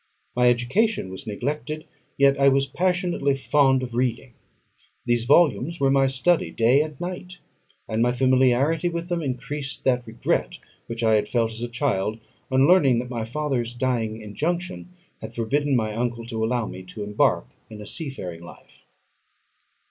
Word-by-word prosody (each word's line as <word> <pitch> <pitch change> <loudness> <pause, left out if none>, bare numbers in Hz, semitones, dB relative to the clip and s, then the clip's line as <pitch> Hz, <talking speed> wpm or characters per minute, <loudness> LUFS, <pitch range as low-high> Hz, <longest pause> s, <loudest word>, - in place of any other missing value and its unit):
My 125 0 +4
education 120 - +1
was 95 - -8
neglected, 150 +8 -4 0.3
yet 140 0 +4
I 140 0 +6
was 135 0 +2
passionately 175 -2 0
fond 135 -1 +3
of 125 -2 -6
reading. 120 0 -1 0.7
These 120 -1 +1
volumes 150 +2 +3
were 135 -1 +3
my 135 0 +4
study 145 +6 +1
day 120 +5 +3
and 150 -2 -5
night, 180 0 -6 0.5
and 110 +1 -1
my 120 +1 +3
familiarity 130 +6 +2
with 170 +1 -5
them 175 -1 -1
increased 135 +1 -4
that 125 -2 +1
regret 110 - -1 0.3
which 115 0 -4
I 110 -1 +4
had 105 - +2
felt, 115 -2 0
as 110 +1 -8
a 120 - -2
child, 115 -4 -1 0.3
on 130 0 +4
learning 155 -9 +5
that 125 +1 -4
my 115 -2 -3
father's 120 -2 -2
dying 120 -3 -1
injunction 175 - -3 0.3
had - - -8
forbidden 140 +5 0
my 110 -3 0
uncle 115 0 -2
to 115 -2 -3
allow 120 0 0
me 95 - -7
to 95 +3 -8
embark 105 -11 +1 0.2
in 110 - -10
a 105 - -8
seafaring 100 - -6
life. 85 - -15
130 Hz, 165 wpm, -24 LUFS, 115-150 Hz, 0.7 s, I